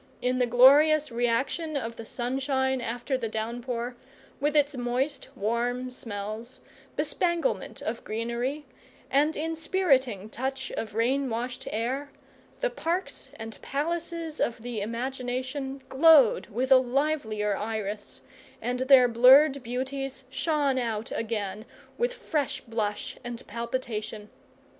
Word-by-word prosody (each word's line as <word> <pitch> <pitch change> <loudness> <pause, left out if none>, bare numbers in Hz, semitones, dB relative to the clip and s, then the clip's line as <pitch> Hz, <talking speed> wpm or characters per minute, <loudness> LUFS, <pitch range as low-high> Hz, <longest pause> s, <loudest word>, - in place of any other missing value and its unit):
In 250 +1 0
the 250 - +3
glorious 285 +5 +6
reaction 255 +7 0
of 230 -3 -4
the 230 - -8
sunshine 265 +2 0
after 245 +3 -2
the 230 -3 -2
downpour, 235 +2 -3 0.4
with 295 +2 0
its 290 -1 +3
moist 255 +4 -1
warm 245 +3 -1
smells, 220 +1 -5 0.4
bespanglement 345 +7 -1
of - - -3
greenery, 235 +6 -3 0.5
and 295 +3 +3
inspiriting 305 - +1
touch 265 +4 -4
of 215 -2 -5
rain 260 +4 +1
washed 240 +2 -4
air, 255 +6 -2 0.5
the - - +1
parks 360 -5 -2
and 225 0 -8
palaces 330 +2 -3
of 230 -1 -1
the 240 -3 -3
imagination 260 +4 -3
glowed 285 -4 +6
with 250 +4 -2
a 265 - +10
livelier 245 -6 0
iris, 210 -1 -4 0.4
and 250 0 -2
their 260 -1 +7
blurred 265 +4 +7
beauties 265 +2 -4
shone 280 -1 +1
out 225 -2 -3
again 215 -2 -3 0.4
with 485 +1 +2
fresh 300 - -2
blush 215 -3 -3
and 240 -1 -6
palpitation. 225 -2 -4
255 Hz, 120 wpm, -27 LUFS, 230-280 Hz, 0.5 s, a